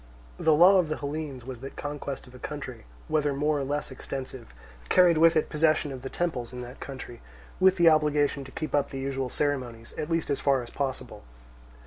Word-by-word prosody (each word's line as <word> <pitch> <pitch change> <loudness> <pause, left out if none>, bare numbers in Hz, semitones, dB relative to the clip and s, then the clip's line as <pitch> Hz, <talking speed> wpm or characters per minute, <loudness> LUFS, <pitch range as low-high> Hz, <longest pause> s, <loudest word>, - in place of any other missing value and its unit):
The 160 - +4
law 185 +5 +7
of 170 -4 +1
the 155 - -2
Hellenes 140 -3 -5
was 130 -2 -7
that 135 +2 -8
conquest 145 -2 -5
of 125 - -16
a 125 - -12
country, 130 -5 -7 0.2
whether 150 -3 +1
more 150 +1 +1
or - - -1
less 145 +1 -3
extensive, 130 -1 -7 0.4
carried 175 -3 +5
with 165 +1 +6
it 155 - +2
possession 155 -1 +2
of 130 -2 -7
the 135 - -5
temples 135 -10 -2
in 125 0 -7
that 125 +2 -9
country, 130 -3 -8 0.4
with 190 0 +5
the 170 -2 +4
obligation 150 -2 +2
to 130 - -11
keep 155 - -5
up 145 -1 +2
the 135 - -6
usual 135 -1 -2
ceremonies, 125 -6 -2
at 150 - -3
least 165 -2 0
as 140 - 0
far 135 -3 +2
as 120 - -11
possible. 130 -6 -4
140 Hz, 205 wpm, -27 LUFS, 130-155 Hz, 0.4 s, law